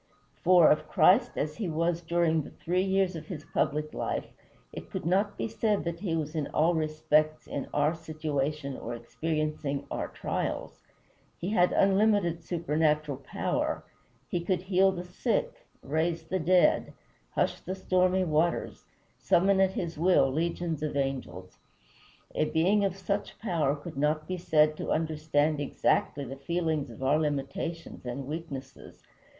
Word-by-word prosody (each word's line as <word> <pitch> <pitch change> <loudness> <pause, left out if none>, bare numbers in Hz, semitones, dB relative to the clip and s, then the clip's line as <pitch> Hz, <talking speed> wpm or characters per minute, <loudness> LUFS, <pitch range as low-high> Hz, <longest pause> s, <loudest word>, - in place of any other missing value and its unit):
For, 180 -2 +7
of 150 - +1
Christ 240 +7 +4
as 150 +1 -2
he 210 -6 -2
was 165 +2 0
during 165 -1 +2
the - - -9
three 180 +2 -1
years 190 -1 +1
of 160 - -7
his 155 -5 -7
public 150 +1 -1
life, - - -2 0.5
it - - -8
could - - -5
not 200 +4 +1
be - - -1
said 220 -2 0
that 170 0 -4
he 170 -4 -1
was 155 -1 -3
in 155 -3 -2
all 165 +3 +2
respects 155 -1 +1
in 140 - -4
our 150 +2 +2
situation 155 -3 -3
or 120 -1 -5
experiencing 150 +3 -3
our - - -2
trials. - - -4 0.6
He 180 - -3
had 180 -4 +4
unlimited 195 -4 +3
supernatural 155 -4 0
power; 135 - -2 0.4
he 175 - -2
could 180 0 0
heal 190 0 +4
the 180 -2 -5
sick, 180 0 -2 0.2
raise 160 +3 -1
the 185 +4 -2
dead, 175 -1 +3 0.4
hush - - +1
the 185 - -5
stormy 185 0 +2
waters, 165 0 0 0.3
summon 190 +2 +3
at 190 0 +3
his 170 -4 -4
will 175 -5 +4
legions 165 +1 -2
of 150 -2 -2
angels. 130 -10 -4 0.7
A - - +1
being 185 +7 +2
of 195 -2 0
such 200 +1 -3
power 160 -9 0
could 150 0 -9
not 155 +2 0
be 185 - -2
said 155 -2 +3
to - - -4
understand 155 -1 +1
exactly 145 0 0
the 135 +2 -7
feelings 160 0 -1
of 115 +3 -9
our 145 +4 +3
limitations 150 +3 -3
and 125 +2 -5
weaknesses. 150 -2 -8
160 Hz, 155 wpm, -29 LUFS, 150-180 Hz, 0.7 s, For